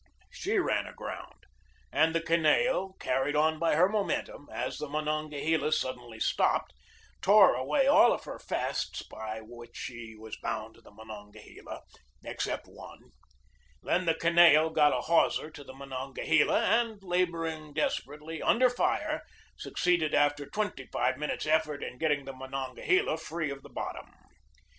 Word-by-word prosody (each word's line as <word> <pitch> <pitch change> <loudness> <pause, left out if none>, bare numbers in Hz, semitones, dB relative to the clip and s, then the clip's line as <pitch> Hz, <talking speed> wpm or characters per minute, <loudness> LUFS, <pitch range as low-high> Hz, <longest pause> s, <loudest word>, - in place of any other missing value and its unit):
She 440 -3 -2
ran 370 - +1
aground, - - -9 0.5
and 160 +1 +2
the 165 - +2
Kineo, 185 - +2
car 135 +1 0
ried 145 +1 -1
on 155 +1 +2
by 165 -2 +2
her 175 +4 +5
momentum 200 -7 -2
as 125 +2 -4
the 150 - -5
Monongahela 155 +1 -1
sud 130 -4 0
denly 120 -2 -12
stopped, - - +1 0.5
tore 200 0 +7
away 135 - +1
all 300 +5 +6
of - - -2
her - - -8
fasts - - -3
by 110 0 -7
which 120 +1 -12
she 115 -3 -7
was 110 0 -9
bound 110 +1 -4
to - - -20
the - - -17
Monongahela 105 -1 -11 0.4
except - - -3
one. - - -14 0.7
Then 180 +1 +1
the 165 - +3
Kineo 165 -2 +5
got 150 -2 +5
a - - 0
hawser 165 -1 +2
to 145 -2 -11
the 130 - -12
Monongahela, 135 +2 0
and, 225 -3 +1
laboring 165 -4 -1
desperately, 150 +1 -3
under 250 +1 +4
fire, 245 - 0 0.3
succeeded 170 -4 0
after 145 0 +2
twenty 205 -11 -3
five 130 +1 0
minutes' 150 +1 -3
effort 155 -2 +1
in 125 - -7
getting 145 -3 +1
the 135 - -6
Monon 130 0 -5
gahela 370 - +1
free 160 -2 -3
of 140 0 -7
the - - -14
bottom. - - -6
155 Hz, 150 wpm, -29 LUFS, 130-170 Hz, 0.7 s, tore